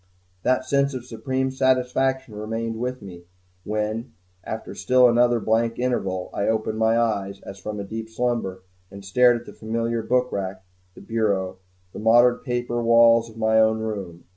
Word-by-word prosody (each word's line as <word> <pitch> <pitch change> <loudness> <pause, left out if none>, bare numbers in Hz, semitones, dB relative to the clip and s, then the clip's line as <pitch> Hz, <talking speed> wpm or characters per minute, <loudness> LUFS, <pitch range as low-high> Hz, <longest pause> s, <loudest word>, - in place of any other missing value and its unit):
That 130 +4 +1
sense 140 +1 +1
of 125 -1 -6
supreme 130 +2 -2
satisfaction 130 -1 +1
remained 115 +2 -4
with 125 -1 -4
me 90 -3 -11 0.4
when, 110 +3 -3 0.3
after 110 - -6
still 125 0 +4
another 120 0 +3
blank 115 +1 0
interval, 95 -7 -2
I 100 - -1
opened 110 0 -1
my 110 +1 +3
eyes 100 -4 -1
as 100 0 -10
from 105 +2 -5
a - - -3
deep 110 +2 -6
slumber, 110 -6 -2 0.3
and 100 0 -11
stared 120 +4 +4
at 120 - -16
the - - -11
familiar 115 +1 -2
book 125 +3 +1
rack, 95 -1 -4 0.3
the - - -12
bureau, 100 -5 -1 0.3
the - - -7
mottled 120 +3 +4
paper 120 -2 -2
walls 115 0 +5
of 110 - -15
my 110 0 +3
own 110 0 +4
room. 100 -6 -5
115 Hz, 165 wpm, -23 LUFS, 105-125 Hz, 0.4 s, walls